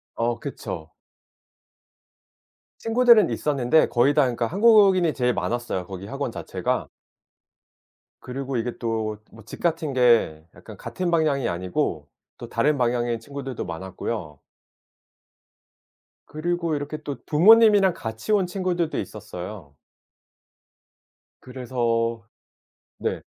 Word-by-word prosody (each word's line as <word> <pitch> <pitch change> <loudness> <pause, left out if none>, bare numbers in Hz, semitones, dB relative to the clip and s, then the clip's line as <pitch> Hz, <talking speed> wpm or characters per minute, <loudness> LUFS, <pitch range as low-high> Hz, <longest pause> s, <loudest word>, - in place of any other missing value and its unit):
어 115 0 -1
그쵸. 90 - -7 1.9
친구들은 230 -3 +5
있었는데 145 +1 +2
거의 130 +4 +3
다 150 - +4
그러니까 120 -2 0
한국인이 195 - +5
제일 125 -1 +1
많았어요 120 -7 -3
거기 95 0 -8
학원 - - -4
자체가. - - -3 1.3
그리고 135 +1 -4
이게 120 +1 -3
또 110 -2 -2
뭐 110 - -14
집 110 - -10
같은 160 -4 -1
게 115 -11 +3
약간 - - -12
같은 180 -2 -4
방향이 155 -6 +1
아니고 90 +1 -2 0.3
또 - - -8
다른 150 -1 +1
방향의 120 -1 0
친구들도 135 0 -6
많았고요. 85 -1 -6 1.9
그리고 170 +1 -2
이렇게 145 +1 -4
또 145 -2 -5
부모님이랑 205 +2 +6
같이 110 - -4
온 200 -3 +3
친구들도 180 -3 -2
있었어요. 95 -6 -8 1.7
그래서 120 -3 -2 0.8
네. - - -3
130 Hz, 250 characters per minute, -24 LUFS, 115-165 Hz, 1.9 s, 부모님이랑